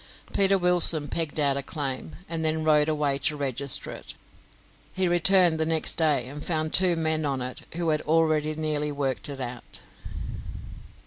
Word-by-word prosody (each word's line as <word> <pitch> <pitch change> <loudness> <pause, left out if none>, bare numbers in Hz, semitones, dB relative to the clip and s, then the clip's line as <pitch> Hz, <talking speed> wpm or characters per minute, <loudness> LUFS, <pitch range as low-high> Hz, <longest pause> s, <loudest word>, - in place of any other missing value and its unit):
Peter 195 0 +4
Wilson 175 -4 +5
pegged 160 -2 -3
out 140 -2 +2
a - - -2
claim, 140 +1 -6
and 165 -1 -4
then 155 0 -1
rode 150 -1 +2
away 145 -3 -1
to 150 +1 -1
register 140 -1 +2
it. - - -10 0.8
He 185 -1 -1
returned 175 -1 +4
next 160 -1 +1
day 150 -6 0
and 145 +2 -9
found 155 -2 -3
two 180 -2 +3
men 160 -1 0
on 140 -3 -2
it 125 0 -6
who 170 -1 -2
had 155 -1 0
already 155 -1 0
nearly 150 -1 -2
worked 140 -1 -3
it 140 -1 -8
out. 125 -1 -5
155 Hz, 165 wpm, -25 LUFS, 140-165 Hz, 0.8 s, Wilson